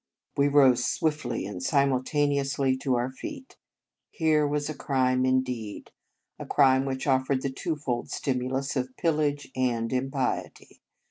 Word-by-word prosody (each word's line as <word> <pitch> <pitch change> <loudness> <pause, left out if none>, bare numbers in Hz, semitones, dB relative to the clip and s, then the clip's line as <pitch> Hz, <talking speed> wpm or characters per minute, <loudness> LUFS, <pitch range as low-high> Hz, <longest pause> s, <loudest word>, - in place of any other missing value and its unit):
We 140 0 +3
rose 135 -4 +5
swiftly 150 -4 -1
and 95 -3 -6
simultaneously 140 - +1
to 130 -1 0
our 120 +2 -1
feet. 270 - -9 0.5
Here 155 -3 +2
was 145 0 -1
a 155 - -3
crime, 130 -3 +1
in 130 0 +3
deed; 115 -5 -6 0.5
a - - -6
crime 135 -2 +4
which 130 -1 -3
offered 130 0 +1
the 135 - -1
two 155 +4 -3
fold 125 -5 -3
stimulus 130 +1 -2
of 130 -1 -3
pillage 150 -4 0
and 120 -2 0
impiety. 135 0 -3
135 Hz, 140 wpm, -27 LUFS, 130-145 Hz, 0.5 s, rose